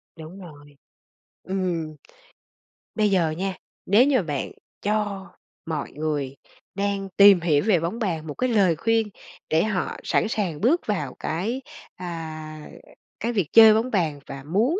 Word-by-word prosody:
Đúng 165 +4 -10
rồi. 145 -4 -13 0.7
Ừm, 175 -5 -2 1.0
bây 210 -2 +2
giờ 170 -5 +2
nha, 185 +3 -3 0.3
nếu 215 +7 +5
như 265 -6 +3
bạn 145 -5 -3 0.3
cho 205 -2 -1 0.4
mọi 155 -3 -4
người 145 -3 -3 0.4
đang 200 -1 -2
tìm 200 -2 +8
hiểu 150 -3 +2
về 190 -7 +4
bóng 170 +9 -3
bàn 165 -7 -2
một 145 - -4
cái 255 - -1
lời 195 -7 +3
khuyên 225 +4 +1 0.4
để 160 +1 +3
họ 210 -4 -2
sẵn - - +1
sàng 195 -8 -2
bước 300 +10 +2
vào 150 -11 -2
cái, 215 +12 -2 0.3
à, 155 -3 -7 0.5
cái 235 +2 -2
việc 195 -8 0
chơi 220 -1 +9
bóng 230 +4 0
bàn 160 -8 0
và 135 -1 -8
muốn 225 - +1
185 Hz, 150 wpm, -24 LUFS, 155-215 Hz, 1.0 s, chơi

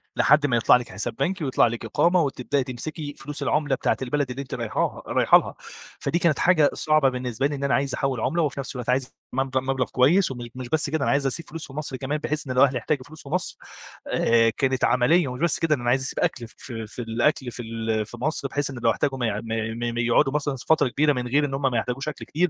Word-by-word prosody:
لحد 150 -1 +4
ما 120 -4 +2
يطلع 115 - +5
لِك 125 -1 -7
حساب 100 +4 -4
بنكي 180 +4 -1
ويطلع 130 -3 +3
لِك 115 0 -5
إقامة 175 +1 +3
وتبدأي 140 -1 -1
تمسكي 145 +4 -6
فلوس 150 0 -6
العُملة 150 -3 +1
بتاعة - - 0
البلد 140 +1 -1
اللي 125 +2 -4
أنتِ 140 - -9
رايحاها 115 -3 -2
رايحه - - +5
لها، - - -4 0.5
فدي 170 - 0
كانت 170 -4 +2
حاجة 160 -5 +4
صعبة 155 -3 +3
بالنسبة 125 +1 -2
لي 145 - -4
إن 140 - -6
أنا 140 - +1
عايز 140 -1 +1
أحوّل 135 -4 -1
عُملة 170 +7 +1
وفي 145 -3 -1
نفس 135 - -5
الوقت 125 -1 -5
عايز 130 0 0 0.2
مب 130 0 -1
مبلغ 130 0 0
كويس 155 +8 +3
وم 120 -2 -6
مش 130 -1 -7
بس 150 0 +1
كده، 155 -1 -1
أنا - - +2
عايز 140 0 +1
أسيب 155 +4 -3
فلوس 165 +1 -7
في 135 - -13
مصر 145 -2 -4
كمان، 140 +3 -2
بحيث 150 0 -3
إن 130 - -2
لو 130 +2 +5
أهلي 135 -2 +2
احتاجوا 135 +2 -1
فلوس 155 +1 -13
في 140 - -11
مصر، 180 +4 -1 0.5
آآ 115 0 +3
كانت 130 -2 0
عملية 140 +6 +3
ومش 125 +2 -6
بس 170 -1 +2
كده 160 -2 +2
ده 125 - -8
أنا 120 - 0
عايز 130 +2 +3
أسيب 135 - -3
أكل 120 -2 -1
ف - - -18
في 115 -3 -7
في 110 - -11
الأكل 120 +3 0
في 120 - -7
ال 110 -1 -2
في 110 +3 -11
مصر، 140 +2 -1
بحيث 145 +1 -2
إن 130 -3 -7
لو 115 - +5
احتاجوا 135 +3 -1
ما 125 - -1
يع 105 -1 -2
ما 115 +1 -3
ما 120 - -1
يقعدوا 120 +3 +3
مثلًا 145 -1 -1
س 125 - -8
فترة 160 -3 +3
كبيرة 145 +4 +2
من 125 -2 -3
غير 145 +4 +2
إن 140 - -4
هم 135 - -2
ما 120 - 0
يحتاجوش 125 +5 -3
أكل 150 - -8
كتير 175 +4 0
135 Hz, 260 wpm, -24 LUFS, 120-150 Hz, 0.5 s, يطلع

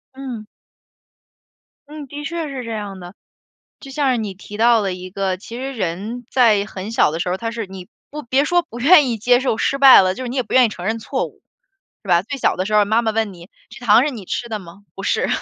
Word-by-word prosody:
嗯。 255 -5 -7 1.4
嗯， 300 -1 -9
的 290 +3 -8
确 330 +2 -4
是 265 -2 -6
这 230 - -6
样 205 -3 -5
的。 175 +1 -10 0.7
就 275 - -12
像 275 -1 0
是 250 - +1
你 205 -3 -4
提 205 +2 -10
到 230 0 +4
了 195 -2 -1
一 180 0 -8
个， 190 -1 -2
其 230 +5 -10
实 270 +2 -5
人 215 +3 -4
在 220 -6 +4
很 195 +1 -7
小 190 - +3
的 165 +2 -4
时 180 - -2
候， 180 - 0
他 230 +3 -4
是 230 -2 -5
你 185 -1 -10 0.2
不 300 +1 -7
别 260 +3 +1
说 350 +3 +2
不 240 -8 -11
愿 295 -1 +6
意 235 - -1
接 245 +3 +3
受 255 -4 0
失 275 - 0
败 270 -7 +9
了， 185 0 0
就 255 - -6
是 - - -4
你 250 - -5
也 255 - +1
不 225 - -11
愿 255 - +6
意 - - -2
承 180 -4 -8
认 220 +3 -1
错 255 +4 -3
误， - - -18 0.6
是 195 - -13
吧？ 175 -1 +4
最 275 +8 -6
小 - - +1
的 185 - -2
时 215 - -2
候， 210 -1 +5
妈 220 +3 +2
妈 220 -1 0
问 220 -2 -1
你： 175 -1 -14 0.2
“这 245 +1 -12
糖 220 +3 +6
是 300 - 0
你 225 -8 -8
吃 240 - -4
的 220 -2 -3
吗？” 190 +2 -14
“不 195 - -8
是。” - - 0
225 Hz, 275 characters per minute, -20 LUFS, 195-260 Hz, 1.4 s, 败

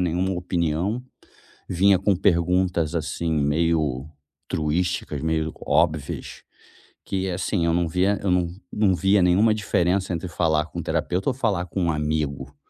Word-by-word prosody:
nenhuma 90 +2 0
opinião, 90 +4 -1 0.7
vinha 95 +1 +4
com 100 +1 +2
perguntas, 90 -2 +1
assim, 80 +1 -2
meio 75 -2 +1 0.4
truísticas, 80 -1 -1
meio 80 -1 0
óbvias, 75 -2 0 0.6
que, 95 0 -2
assim, 90 0 -1
eu 85 - +2
não 85 -1 +1
via 95 +5 +1
eu 100 - -1
não 90 -1 +2 0.2
não 105 -3 +2
via 95 +2 +3
nenhuma 100 +5 +4
diferença 95 -2 0
entre 85 +2 -3
falar 80 -3 +1
com - - -7
um - - -4
terapeuta 90 +6 -1
ou - - -4
falar 110 -8 -1
com 90 0 -2
um 85 - +2
amigo, 75 -3 -2
85 Hz, 145 wpm, -24 LUFS, 80-95 Hz, 0.7 s, vinha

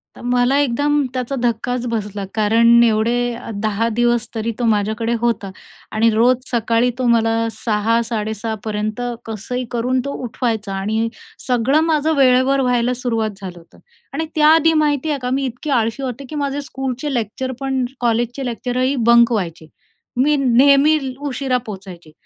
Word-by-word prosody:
तर - - -13
मला 245 +2 +2
एकदम 290 +2 +1
त्याचा 255 +1 -3
धक्काच 245 +1 -1
बसला. 210 -3 -3
कारण 230 +2 +4
एवढे 225 +1 +2 0.5
10 215 +1 0
दिवस 240 -1 +2
तरी 225 +1 -2
तो 240 - 0
माझ्याकडे 220 +3 -1
होता 230 -4 0 0.4
आणि 225 +1 +3
रोज 240 +4 +4 0.2
सकाळी 235 0 +2
तो 255 - 0
मला 225 0 +1
6.00-6.30पर्यंत 220 0 -2 0.2
कसंही 225 +3 -4
करून 250 +2 0
तो 280 - -3
उठवायचा. 225 -4 -2
आणि 215 +4 -1 0.4
सगळं 255 +4 +2
माझं 320 -1 +1
वेळेवर 260 +1 +4
व्हायला 250 -1 +1
सुरुवात 230 -3 -1
झालं 180 -2 -7
होतं. 165 - -20 0.3
आणि 320 +3 -2
त्याआधी 320 +1 +5
माहिती 295 0 0
आहे 290 - -1
का, 250 -1 -3
मी 270 +1 0
इतकी 255 +4 -5
आळशी 225 +4 -2
होते, 255 +1 -5
की 305 - -6
माझे 285 0 -2
स्कूलचे 270 0 -4
लेक्चर 240 +2 -3
पण, 270 -1 -1 0.2
कॉलेजचे 240 +2 -1
लेक्चरही 250 +2 -1
बंक 235 0 +6
व्हायचे. 170 -7 -3 0.5
मी 295 +4 +3
नेहमी 275 +4 +5 0.3
उशिरा 265 -1 -1
पोहोचायचे. 185 -6 -9
240 Hz, 145 wpm, -19 LUFS, 220-265 Hz, 0.5 s, बंक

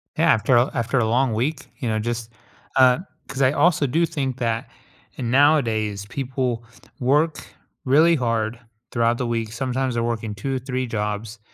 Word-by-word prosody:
Yeah, - - +4
after 120 +3 +2
a 120 +3 +3
after 125 0 0
a 115 - +2
long 125 +2 +2
week, 130 +7 -2
you 120 - -2
know, 110 0 0
just, 115 0 -3 0.4
uh 130 -1 +5 0.3
'cause 135 - -4
I 130 -1 +5
also 150 0 +3
do 165 +7 +2
think 135 -6 -3
that 115 -2 -2 0.5
nowadays 115 -6 +2
people 130 -3 -2 0.4
work 145 +5 +1 0.4
really 155 +6 +5
hard 115 -3 -1 0.3
throughout 115 0 +1
the 125 - -2
week, 115 -2 -2
sometimes 130 +2 -2
they're 115 - 0
working 115 -2 -2
2 135 +7 -3
or - - -1
3 130 0 -3
jobs 105 0 -3
125 Hz, 165 wpm, -23 LUFS, 115-135 Hz, 0.5 s, uh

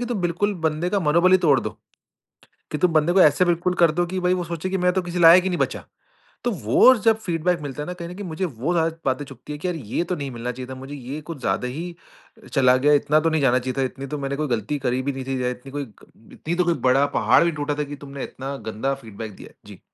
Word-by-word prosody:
कि 245 - -2
तुम 230 -5 -2
बिल्कुल 185 +4 0
बंदे 160 +4 -3
का 200 - +1
मनोबल 170 +3 +3
ही 185 - +7
तोड़ 145 -7 +4
दो - - -6 0.9
कि 150 - -1
तुम 175 +1 +2
बंदे 155 +2 +3
को 190 - +4
ऐसा 150 +4 +5
बिल्कुल 175 +1 +1
कर 170 - +6
दो 175 +1 0
कि 185 +1 -3
भाई 180 0 +2
वो 180 - -2
सोचे 170 +2 -4
कि 190 - 0
मैं 180 0 +2
तो 185 0 0
किसी 175 0 -4
लायक 170 +2 +8
ही 190 - +1
नहीं 175 - -2
बचा। - - -2 0.6
तो 240 - 0
वो 160 - +5
जब 220 0 +2
फीडबैक 175 -3 -1
मिलता 145 0 -6
है - - -8
ना 180 - -4
कहीं 170 -1 -8
न - - -7
कहीं 205 - -7
मुझे 165 +3 -2
वो 145 +3 -2
ज़्यादा 165 -1 0
बातें 135 +2 0
चुभती 135 +2 -10
हैं 145 - -7
कि 185 - -2
यार 180 - -1
ये 135 +2 -3
तो 180 - -2
नहीं 140 -3 -5
मिलना 120 +1 -4
चाहिए 125 +1 -8
था - - -6
मुझे, 135 +2 -8
ये 140 +3 -7
कुछ 160 -2 -8
ज़्यादा 95 +3 -1
ही 170 +7 -6 0.6
चला 130 -3 +5
गया, 145 +3 +3
इतना 150 +1 +3
तो 165 +1 +1
नहीं 160 -2 0
जाना 130 -1 +3
चाहिए 130 +1 -4
था 135 - +2
इतनी 135 +2 -6
तो 150 +2 -4
मैंने 140 0 -3
कोई 155 -1 -1
गलती 120 +4 -2
करी 125 +1 -1
भी 140 - -1
नहीं 135 -1 -6
थी, 135 0 -2 0.2
इतनी 135 +3 -7 0.5
इतनी 170 +2 -3
तो 180 0 +1
कोई 170 - +3 0.2
बड़ा 135 +2 +4
पहाड़ 115 +9 +5
भी 170 - +2
टूटा 145 0 -1
था 150 - -1
कि 145 0 -7
तुमने 140 0 -7
इतना 135 +1 -6
गंदा 125 +6 -1
फीडबैक 110 -1 -8
दिया - - -12
है। - - -24
जी। - - -12
150 Hz, 275 wpm, -23 LUFS, 135-175 Hz, 0.9 s, लायक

